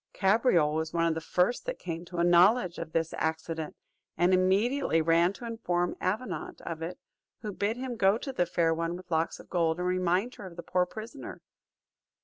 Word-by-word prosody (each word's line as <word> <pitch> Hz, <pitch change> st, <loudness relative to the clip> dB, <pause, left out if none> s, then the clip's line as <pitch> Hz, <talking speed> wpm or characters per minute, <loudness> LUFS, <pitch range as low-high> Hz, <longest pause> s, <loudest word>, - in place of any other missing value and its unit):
Cabriole 195 Hz, -, +3 dB
was 160 Hz, 0 st, -2 dB
one 170 Hz, -1 st, +2 dB
of 165 Hz, -, +2 dB
the 160 Hz, -, -4 dB
first 180 Hz, -, 0 dB
that -, -, -2 dB
came 170 Hz, 0 st, -5 dB
to 175 Hz, 0 st, -8 dB
a 170 Hz, -, +2 dB
knowledge 175 Hz, +2 st, +4 dB
of 165 Hz, -1 st, -6 dB
this 165 Hz, 0 st, -1 dB
accident, 160 Hz, 0 st, -3 dB, 0.4 s
and 175 Hz, +3 st, +3 dB
immediately 190 Hz, -, +2 dB
ran 165 Hz, +2 st, +3 dB
to 235 Hz, -, -9 dB
inform 180 Hz, -7 st, -1 dB
Avenant 255 Hz, -, -3 dB
of 165 Hz, -1 st, -6 dB
it 175 Hz, +2 st, -5 dB, 0.5 s
who 210 Hz, -, -3 dB
bid 205 Hz, +4 st, -1 dB
him 250 Hz, -2 st, -4 dB
go 195 Hz, 0 st, +4 dB
to 270 Hz, +3 st, -6 dB
the 175 Hz, -7 st, +1 dB
Fair 165 Hz, -1 st, +2 dB
One 165 Hz, +1 st, -2 dB
with 180 Hz, -1 st, -14 dB
Locks 160 Hz, 0 st, 0 dB
of -, -, -13 dB
Gold, 165 Hz, -2 st, +1 dB
and 180 Hz, -, -2 dB
remind 185 Hz, +6 st, +1 dB
her 195 Hz, -, -7 dB
of 175 Hz, -, -12 dB
the 170 Hz, -, -7 dB
poor 180 Hz, 0 st, +1 dB
prisoner. 220 Hz, +1 st, -8 dB
180 Hz, 200 wpm, -29 LUFS, 165-210 Hz, 0.5 s, knowledge